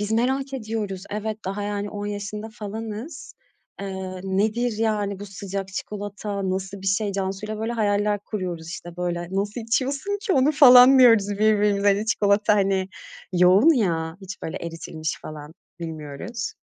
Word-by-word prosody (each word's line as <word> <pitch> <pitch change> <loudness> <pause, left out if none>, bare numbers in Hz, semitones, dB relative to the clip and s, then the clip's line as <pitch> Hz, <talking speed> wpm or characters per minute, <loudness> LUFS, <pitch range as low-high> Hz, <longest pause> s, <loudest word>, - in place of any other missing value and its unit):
Biz 210 +1 -2
merak 265 +4 0
ediyoruz. 215 -6 -4
Evet, 215 +1 -3
daha 200 +2 -3
yani, 205 0 -3
10 205 0 -5
yaşında 210 +1 -5
falanız. 225 +7 -7 0.5
Eee, 190 -1 -5
nedir 215 +4 0
yani 205 -3 0
bu 205 - -6
sıcak 195 0 -5
çikolata, 200 0 -4
nasıl 190 +1 -4
bir 195 - -6
şey? 200 +1 +1
Cansuyla 195 +2 -3
böyle 225 +2 -2
hayaller 205 -2 +1
kuruyoruz 180 -6 -5
işte 175 0 -8
böyle. 175 -1 -2
Nasıl 205 +4 -2
içiyorsun 275 - -1
ki 395 - 0
onu 280 +1 +4
falan 260 -2 +9
diyoruz 225 -5 +6
birbirimize. 205 -1 +3
Hani 205 +2 +2
çikolata 210 -1 +3
hani 195 -2 +1 0.4
yoğun 185 - +6
ya, 165 -7 0
hiç 190 0 -9
böyle 160 - -4
eritilmiş 165 -1 -5
falan 150 0 -9 0.3
bilmiyoruz. 160 +7 -6
205 Hz, 145 wpm, -24 LUFS, 190-220 Hz, 0.5 s, falan